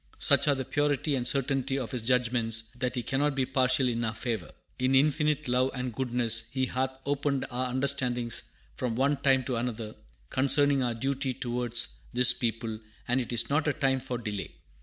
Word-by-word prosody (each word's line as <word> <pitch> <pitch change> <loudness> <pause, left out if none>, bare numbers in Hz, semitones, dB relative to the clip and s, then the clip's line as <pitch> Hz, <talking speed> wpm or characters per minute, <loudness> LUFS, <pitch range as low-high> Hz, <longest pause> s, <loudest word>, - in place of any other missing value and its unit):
Such - - +4
are 145 - +4
the 130 -1 -4
purity 145 +1 0
and 125 -2 0
certainty 135 0 0
of 130 -2 -4
His 125 -3 -2
judgments 115 -2 +1
that 125 +1 -2
He 125 - -2
cannot 140 +3 0
be 135 -1 +1
partial 130 0 +2
in 120 -1 -1
our 110 0 -2
favor. 110 -9 -3 0.3
In 130 +1 +2
infinite 150 +1 +2
love 125 +1 +2
and 125 -1 -3
goodness 120 -2 0
He 130 -1 0
hath 130 +1 -1 0.2
opened 140 -1 0
our 125 +1 -1
understandings 125 -3 0 0.3
from 125 -3 -3
one 140 +3 +2
time 135 -1 +3
to 125 -1 -2
another, 115 -2 -3 0.4
concerning 140 +1 +3
our 120 -2 0
duty 135 +1 -1
towards 120 -1 -1 0.2
this 125 -1 +5
people; 115 -2 -3 0.3
and 125 +2 +2
it 120 - -6
is 120 -1 0
not 150 +2 +1
a 150 - +2
time 135 0 +1
for 125 -1 -4
delay. 105 -4 -5
130 Hz, 185 wpm, -29 LUFS, 120-135 Hz, 0.4 s, this